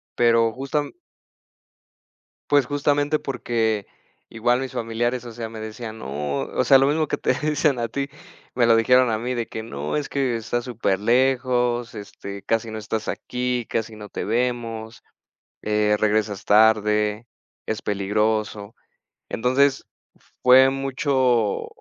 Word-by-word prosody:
pero 115 -1 +3
justam 140 +4 -3 1.6
Pues 145 -3 +4
justamente 145 +2 +1
porque 115 -6 -1 0.4
igual 120 +2 +1
mis 135 -1 -4
familiares, 120 +2 -2
o 120 - -8
sea, 115 0 -6
me 110 0 -9
decían: 110 +1 -7
"No", 70 -4 -3
o 100 - -1
sea, 135 +2 +6
lo 135 - +4
mismo 155 +1 +1
que - - -1
te - - +1
dicen 150 -3 0
a 115 - -1
ti, 140 +4 -3 0.5
me 120 -2 +3
lo 115 -1 +5
dijeron 125 +2 +4
a 110 - 0
mí 125 +3 -3
de 120 -2 -2
que: 110 - -6
"No, 75 -8 -4
es 150 -2 -2
que 135 -4 0
está 115 +2 -2
superlejos", 120 +2 +1
este, 100 -1 -8
"casi 115 0 -1
no 110 - -5
estás 110 0 -4
aquí, 125 -1 -2
casi 110 -1 -3
no 105 -1 -9
te - - -4
vemos", 115 -1 -2 0.6
eh, 105 0 +2
"regresas 105 -2 0
tarde, 105 0 +3 0.4
es 110 -1 -3
peligroso", 105 +1 -1 0.6
entonces, 130 +3 +1 0.6
fue 130 +1 +7
mucho 130 -5 0
115 Hz, 140 wpm, -23 LUFS, 110-130 Hz, 1.6 s, fue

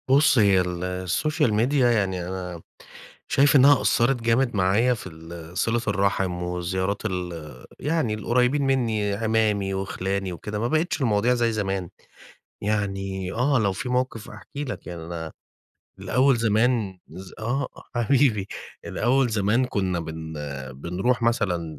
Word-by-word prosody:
بُصّ، 140 +1 +5
هي 100 -3 +5
ال 90 +1 -3
الsocial 150 - +1
media 115 +6 +1
يعني 95 -7 +1
أنا 90 -2 -5 0.7
شايِف 145 +2 +4
إنها 140 0 +7
أثَّرت 120 +1 +2
جامد 115 +1 +2
معايا 100 +6 +3
في 115 - -7
ال 80 +1 -10
صلة 115 +1 +1
الرحم 100 -2 +1
والزيارات 95 +3 -2
ال 85 - -5
يعني 150 -6 0
القريبين 125 +6 +1
مني، 115 -7 +1
عمامي 105 -2 +1
وخلاني 95 0 -2
وكده، 105 +4 -5
ما 115 - 0
بقِتِش 155 +2 0
المواضيع 115 0 +2
زي 120 -2 +1
زمان. 95 -4 -2 0.7
يعني 95 -3 -2
آه، 130 +3 +2
لو 100 -3 +2
في 110 +7 -5
موقف 125 -3 -1
أحكِ 105 -5 -12
لك، 145 -3 -5
يعني 85 -2 -6
أنا 80 -1 -6 0.7
الأول 130 +2 +3
زمان 110 -2 +1
ز 95 0 -10
آه، 120 +5 -1 0.3
حبيبي، 120 -4 +2 0.4
الأول 130 +2 +1
زمان 110 +4 +2
كنا 95 -7 -1
بن 80 -1 -6 0.4
بنرُوح 90 - -1
مثلًا 90 -9 0
105 Hz, 135 wpm, -24 LUFS, 95-120 Hz, 0.7 s, إنها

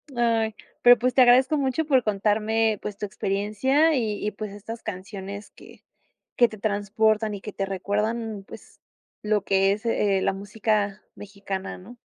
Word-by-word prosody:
ay, 225 -2 +1 0.3
pero, 245 0 +8
pues, 250 +1 +1
te 260 - +6
agradezco 255 +4 +5
mucho 275 +3 0
por 265 -4 +3
contarme, 215 +1 +1
pues, 205 -1 -6
tu 210 - -3
experiencia, 215 +10 +1
y 215 -5 -2
y, 210 - 0
pues, 210 0 -7
estas 215 +3 -8
canciones 195 +2 -7
que - - -17 0.5
que 240 - +6
te 215 - -10
transportan 215 +1 0
y - - -7
que 210 - -8
te 195 - -2
recuerdan, 210 +3 -2
pues, - - -14 0.4
lo 210 -1 +1
que 195 0 +3
es, 215 +3 -7
eh, 205 -4 +1
la - - +1
música 205 0 -1
mexicana, 200 -1 -6
¿no? 235 +7 -13
210 Hz, 165 wpm, -25 LUFS, 200-230 Hz, 0.5 s, pero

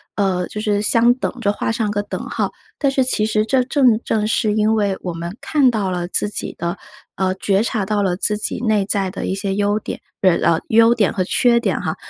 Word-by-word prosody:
呃， 185 -3 0
就 210 - -7
是 210 -2 0
相 230 +3 +4
等 255 - -3
着， 205 -2 +1
画 210 - -2
上 225 -3 -1
个 205 0 -1
等 205 - -6
号。 - - -2 0.3
但 280 -2 +2
是 270 -1 +2
其 250 -4 0
实 215 -1 +1
这 255 +3 +2
正 255 -5 +3
正 215 -1 0
是 215 -1 +1
因 215 +1 +2
为 200 -3 0
我 180 - -4
们 170 +5 -6
看 285 -4 +3
到 210 -5 -1
了 175 -1 -3
自 190 - +1
己 205 - -4
的， 170 +2 -3 0.4
呃， 185 -1 0
觉 195 +1 +1
察 220 -4 -1
到 210 0 0
了 185 -3 0
自 210 +2 +1
己 210 - -3
内 215 -3 +2
在 195 -1 0
的 - - -5
一 190 - -1
些 195 0 -2
优 205 +1 +1
点， 215 - -6 0.2
呃 185 -3 +3
啊， 160 - 0
优 230 +1 +5
点 215 -5 +1
和 185 - 0
缺 235 +5 +3
点 - - -1
哈， - - -2
210 Hz, 255 characters per minute, -19 LUFS, 195-225 Hz, 0.4 s, 优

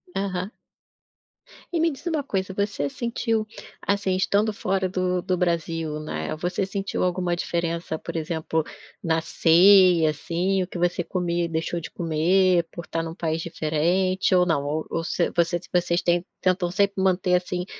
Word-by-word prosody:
Aham. 195 0 -2 1.2
E 335 - 0
me 330 0 +3
diz 270 - -10
uma 310 -4 0
coisa, 190 -6 -2
você 200 -7 -1
sentiu, 230 - -1 0.4
assim, 200 -2 +1
estando 205 +3 +2
fora 190 -2 -1
do 185 -1 0
do 185 -1 -1
Brasil, 165 -3 -1
né, 115 - -4
você 180 +4 -2
sentiu 195 -1 -3
alguma 180 -1 0
diferença 170 -1 -2
por - - -7
exemplo, 160 0 -1 0.4
na 160 -1 +1
ceia, 175 0 +5
assim, 180 +5 -1
o - - -6
que 180 - -7
você 175 0 +1
comia 175 -1 -1
e - - -2
deixou 165 +1 -2
de - - -8
comer, 175 +2 +2
por 170 - -8
estar 165 - -3
em - - -4
um 165 - -6
país 160 -2 -2
diferente, 175 +5 +1
ou 180 -1 +5
não, 145 -4 +1
ou 155 +2 -2
ou 165 - -2
você 165 - 0 0.4
vocês 175 0 +1
tem 175 0 +1 0.2
tentam 185 -1 +1
sempre 200 0 +1
manter, 180 -1 +2
assim, 180 0 -2
180 Hz, 165 wpm, -24 LUFS, 165-190 Hz, 1.2 s, ceia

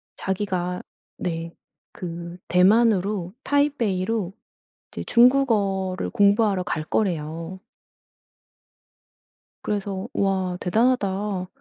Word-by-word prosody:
자기가 185 -2 -2 0.4
네 165 -1 -4 0.4
그 170 0 -7
대만으로 195 -1 +3
타이베이로 225 -9 0 0.6
이제 - - -7
중국어를 215 -7 +3
공부하러 205 -3 +3
갈 155 -3 -3
거래요. 165 -1 -2 2.0
그래서 200 -1 -3
"우와 190 -2 0
대단하다." 200 -3 +1
190 Hz, 190 characters per minute, -24 LUFS, 180-215 Hz, 2.0 s, 대만으로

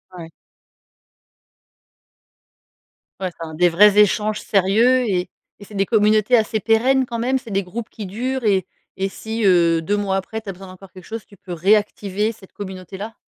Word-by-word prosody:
Ouais. 165 -2 -9 2.9
Ouais, 185 -2 -3
enfin 160 -1 -6
des 175 +3 +4
vrais 205 +4 +5
échanges 210 +1 +3
sérieux 220 +6 +3
et 180 -1 -1 0.3
et 205 - -11
c'est 210 - -15
des 195 -1 0
communautés 215 +2 +3
assez 220 0 0
pérennes 250 +5 +2
quand 235 - -4
même? 255 +3 0
C'est 235 - -13
des 195 0 0
groupes 220 +5 -7
qui 215 - -8
durent 250 +7 -3
et 190 -3 +2 0.3
et 195 0 -2
si, 220 +3 -5
heu, 170 -3 +4
2 205 +6 -1
mois 195 -2 0
après 205 +3 -4
tu 210 -3 -10
as - - -1
besoin 190 +2 -12
d'encore 185 +1 -14
quelque 185 - -13
chose 225 -1 -7
tu 200 - -18
peut 180 -1 -9
réactiver 205 +3 +1
cette 195 -4 -17
communauté 190 -1 -8
là? 220 +3 -7
205 Hz, 180 wpm, -20 LUFS, 185-220 Hz, 2.9 s, vrais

